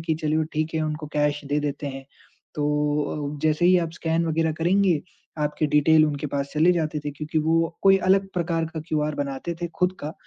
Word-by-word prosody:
कि 160 Hz, 0 st, -1 dB
चलिए 155 Hz, +1 st, +1 dB
ठीक 155 Hz, +1 st, -1 dB
है, 160 Hz, -, +1 dB
उनको 150 Hz, 0 st, -3 dB
कैश 145 Hz, 0 st, 0 dB
दे 145 Hz, +1 st, 0 dB
देते 145 Hz, 0 st, -3 dB
हैं। 135 Hz, -1 st, -6 dB, 0.5 s
तो 150 Hz, 0 st, -1 dB
अ, -, -, -10 dB
जैसे 155 Hz, +2 st, +2 dB
ही 185 Hz, -, +6 dB
आप 165 Hz, -2 st, -2 dB
स्कैन 165 Hz, -1 st, 0 dB
वग़ैरह 160 Hz, 0 st, +1 dB
करेंगे, 180 Hz, -2 st, +3 dB, 0.4 s
आपके 150 Hz, +1 st, 0 dB
डिटेल 155 Hz, +1 st, +5 dB
उनके 145 Hz, 0 st, -3 dB
पास 140 Hz, 0 st, -3 dB
चले 165 Hz, +4 st, +4 dB
जाते 155 Hz, -3 st, -1 dB
थे, 145 Hz, -, -2 dB
क्योंकि 155 Hz, +2 st, -3 dB
वो 165 Hz, +2 st, +1 dB
कोई 195 Hz, 0 st, +6 dB
अलग 195 Hz, 0 st, +3 dB
प्रकार 170 Hz, -2 st, 0 dB
का 160 Hz, -, -3 dB
क्यूआर 150 Hz, -1 st, 0 dB
बनाते 140 Hz, +4 st, -3 dB
थे 170 Hz, -, -1 dB
ख़ुद 180 Hz, 0 st, +3 dB
का, 150 Hz, +2 st, -5 dB
155 Hz, 205 wpm, -24 LUFS, 150-165 Hz, 0.5 s, ही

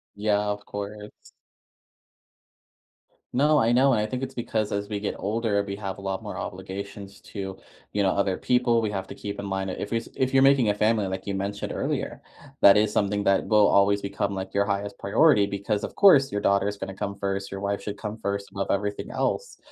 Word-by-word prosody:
Yeah, 105 Hz, 0 st, +1 dB
of 105 Hz, 0 st, -5 dB
course. 105 Hz, +1 st, -8 dB, 2.0 s
No, 150 Hz, +4 st, +4 dB
I 115 Hz, -4 st, +3 dB
know 130 Hz, +3 st, +5 dB
and 110 Hz, -, +2 dB
I 105 Hz, -, +1 dB
think 125 Hz, +4 st, -4 dB
it's 135 Hz, 0 st, -5 dB
because 110 Hz, -3 st, -2 dB
as 100 Hz, 0 st, -2 dB
we 105 Hz, -1 st, -2 dB
get 100 Hz, -, -3 dB
older, 105 Hz, 0 st, 0 dB
we 100 Hz, -1 st, -5 dB
have 100 Hz, -2 st, -5 dB
a -, -, -10 dB
lot 95 Hz, -1 st, -3 dB
more -, -, -6 dB
obligations 100 Hz, +1 st, -7 dB
to, 95 Hz, -2 st, -6 dB, 0.3 s
you 105 Hz, -, 0 dB
know, 95 Hz, -, +3 dB
other 100 Hz, -2 st, 0 dB
people 125 Hz, -2 st, +2 dB
we 110 Hz, -2 st, -1 dB
have 95 Hz, -2 st, -4 dB
to -, -, -9 dB
keep 100 Hz, -1 st, -6 dB
in 100 Hz, -, -4 dB
mind. 95 Hz, -1 st, -2 dB
If 100 Hz, -, -5 dB
is 115 Hz, -1 st, -1 dB
if 130 Hz, +1 st, 0 dB
you're 135 Hz, -, +6 dB
making 135 Hz, -5 st, +5 dB
a 105 Hz, -, +1 dB
family, 105 Hz, -1 st, +2 dB
like 95 Hz, 0 st, -5 dB
you 100 Hz, -, -2 dB
mentioned 100 Hz, +1 st, -3 dB
earlier, -, -, -3 dB, 0.4 s
that 100 Hz, +1 st, +8 dB
is 105 Hz, 0 st, +2 dB
something 100 Hz, 0 st, +1 dB
that 100 Hz, -1 st, +2 dB
will 105 Hz, -2 st, +5 dB
always 100 Hz, +1 st, +3 dB
become, 100 Hz, 0 st, -2 dB
like, 95 Hz, 0 st, -5 dB
your 100 Hz, 0 st, +2 dB
highest 100 Hz, 0 st, -3 dB
priority 100 Hz, +1 st, +4 dB
because, 100 Hz, +1 st, -2 dB
of -, -, -5 dB
course, 140 Hz, -9 st, +6 dB
your 105 Hz, -, -2 dB
daughter 100 Hz, 0 st, +2 dB
is 105 Hz, 0 st, -3 dB
gonna 95 Hz, -, -5 dB
come 100 Hz, +1 st, -4 dB
first. 100 Hz, 0 st, -3 dB
Your 95 Hz, -, -6 dB
wife 100 Hz, 0 st, -2 dB
should 105 Hz, +1 st, -5 dB
come 105 Hz, +1 st, -6 dB
first 100 Hz, 0 st, -3 dB
above 100 Hz, 0 st, -3 dB
everything 100 Hz, +1 st, -1 dB
else. -, -, -2 dB
100 Hz, 215 wpm, -26 LUFS, 100-110 Hz, 2.0 s, that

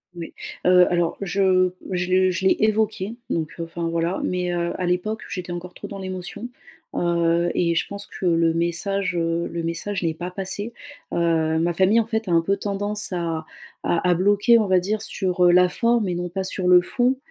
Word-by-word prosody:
Oui. 170 Hz, -1 st, -7 dB, 0.3 s
Heu, 180 Hz, 0 st, +6 dB
alors 175 Hz, -1 st, 0 dB
je 185 Hz, -1 st, +2 dB, 0.2 s
je 180 Hz, 0 st, -1 dB
le 185 Hz, 0 st, +4 dB
je 180 Hz, +2 st, -3 dB
l'ai -, -, +4 dB
évoqué, 215 Hz, -1 st, 0 dB
donc 160 Hz, -2 st, -1 dB
enfin, 165 Hz, 0 st, -4 dB
voilà, 170 Hz, +2 st, -1 dB
mais 180 Hz, -1 st, -1 dB
heu 170 Hz, 0 st, -1 dB
à 180 Hz, -, -1 dB
l'époque 185 Hz, +5 st, -1 dB
j'étais 180 Hz, -4 st, -5 dB
encore 175 Hz, +1 st, -6 dB
trop -, -, -9 dB
dans 200 Hz, -1 st, -8 dB
l'émotion, 185 Hz, +4 st, -6 dB, 0.5 s
heu 170 Hz, 0 st, +1 dB
et 170 Hz, -1 st, +1 dB
je -, -, +1 dB
pense 200 Hz, 0 st, -6 dB
que -, -, -7 dB
le 165 Hz, -1 st, +3 dB
message, 175 Hz, +3 st, 0 dB
heu, 165 Hz, 0 st, 0 dB
le 170 Hz, -1 st, -4 dB
message 180 Hz, +4 st, -2 dB
n'est 165 Hz, -1 st, 0 dB
pas 175 Hz, +3 st, -6 dB
passé. 205 Hz, +4 st, -3 dB, 0.4 s
Heu, 160 Hz, -2 st, +1 dB
ma 170 Hz, +1 st, +1 dB
famille, 195 Hz, +6 st, +4 dB
en 225 Hz, -, +1 dB
fait, 220 Hz, -1 st, -2 dB
a -, -, 0 dB
un 165 Hz, -1 st, +4 dB
peu 195 Hz, +4 st, 0 dB
tendance 205 Hz, +1 st, -2 dB
à 165 Hz, -3 st, -2 dB, 0.4 s
à 175 Hz, +1 st, 0 dB
à -, -, +5 dB
bloquer, 205 Hz, +6 st, +4 dB
on 215 Hz, -, 0 dB
va 185 Hz, -1 st, +4 dB
dire, 210 Hz, +4 st, -2 dB
sur, 185 Hz, -2 st, -1 dB
heu, 175 Hz, -, +6 dB
la 180 Hz, +1 st, +6 dB
forme 230 Hz, +1 st, +1 dB
et 180 Hz, -, -1 dB
non 175 Hz, 0 st, -3 dB
pas 190 Hz, +2 st, -3 dB
sur 185 Hz, -1 st, -2 dB
le 180 Hz, 0 st, +7 dB
fond 250 Hz, +7 st, 0 dB
180 Hz, 210 wpm, -23 LUFS, 170-200 Hz, 0.5 s, le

